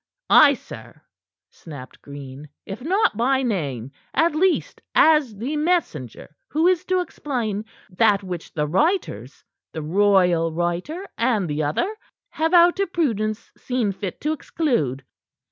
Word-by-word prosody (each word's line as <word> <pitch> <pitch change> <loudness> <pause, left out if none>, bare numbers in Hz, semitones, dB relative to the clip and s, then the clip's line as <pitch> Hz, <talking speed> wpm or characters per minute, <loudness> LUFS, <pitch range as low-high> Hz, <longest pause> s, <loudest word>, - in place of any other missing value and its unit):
"Ay, 285 -2 +8
sir," - - -12 0.5
snapped 145 -6 -11
Green, 140 0 -10 0.2
"if 200 +4 -7
not 380 - +1
by 260 +4 +1
name, 140 - -2 0.2
at 330 0 +3
least 360 +4 0
as 300 -8 +4
the 255 +9 -3
messenger 230 - -2
who 315 +3 +1
is 365 -1 +3
to 370 -1 +1
explain 235 - -3 0.2
that 200 +1 +2
which 180 -3 -6
the 150 -1 -1
writers 315 - -1 0.3
the 160 - -5
royal 180 -1 +3
writer 175 - -3
and 225 -6 +1
the 150 0 -2
other 255 - -1 0.4
have 320 +1 0
out 350 +1 +5
of 395 -3 0
prudence 220 - -1
seen 245 -5 -1
fit 195 -1 -6
to 305 - 0
exclude." 195 - -1
215 Hz, 135 wpm, -22 LUFS, -, 0.5 s, Ay